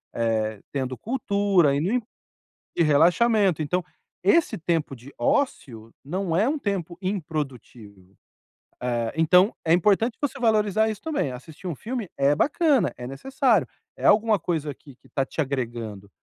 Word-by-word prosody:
eh, 110 -2 -1
tendo 130 -2 -3
cultura, 200 - +1
indo 205 - 0 0.7
e 170 - +3
relaxamento. 175 +4 +3
Então 180 +5 0 0.4
esse 335 -1 +3
tempo 165 -4 -1
de 130 +4 -14
ócio 145 - -1
não 175 +4 -2
é 210 +8 +3
um 305 +1 -1
tempo 185 - -3
improdutivo. 135 - -5 0.7
Eh, 120 -2 -1
então 180 +6 +4
é 165 - +3
importante 210 +6 +2
você 285 -2 -3
valorizar 220 -2 +2
isso 210 -1 -5
também. 300 - -1
Assistir 150 +8 -10
um 170 - -3
filme 225 - -5
é 140 +1 +3
bacana. 290 - +2
É 125 - -7
necessário. 220 - +1 0.3
É - - -6
alguma 215 0 +4
coisa 160 -3 -2
aqui 140 0 -15
que - - -33
está 135 - -1
te 135 - -11
agregando. 120 -8 -3
170 Hz, 145 wpm, -24 LUFS, 135-215 Hz, 0.7 s, então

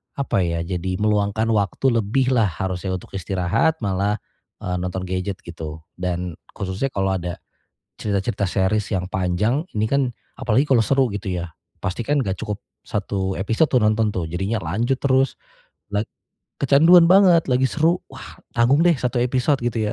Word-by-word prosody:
apa 140 -8 0
ya, 85 -2 0
jadi 90 +1 -3
meluangkan 105 +1 +1
waktu 115 +4 +1
lebih 130 +5 +1
lah 115 -4 +3
harusnya 95 +1 -3
untuk 90 - -9
istirahat, 95 - 0
malah 100 +1 0 0.5
e - - -4
nonton 90 +1 -3
gadget 95 +1 -3
gitu. 80 -2 -8 0.2
Dan 90 -1 -2 0.2
khususnya 95 +7 -2
kalau 95 0 +1
ada 85 0 -4 0.7
cerita-cerita 100 -1 -1
series 95 +3 0
yang 95 -4 -1
panjang, 95 +9 +1 0.2
ini 105 - +2
kan, 135 +2 +1 0.3
apalagi 125 +6 +2
kalau 130 -5 +4
seru 135 +4 +3
gitu 100 -1 -4
ya, 85 -3 -4 0.2
pasti 95 +5 -3
kan 145 +5 0
enggak 95 -1 -2
cukup 105 -1 -3 0.2
1 95 -2 -2
episode 115 - +1
tuh 130 - +3
nonton 110 0 +2
tuh, 90 -4 -2
jadinya 95 +7 -2
lanjut 115 - 0
terus, 135 -1 +2 0.5
lag 105 +1 -1 0.5
kecanduan 160 +6 +6
banget, 180 -3 +6
lagi 130 +1 +3
seru, 165 +3 +1
wah 130 -4 -11 0.2
tanggung 125 +5 +4
deh 175 -2 +4
1 125 -1 -1
episode 130 +3 +1
gitu 110 -3 -1
105 Hz, 160 wpm, -22 LUFS, 95-130 Hz, 0.7 s, kecanduan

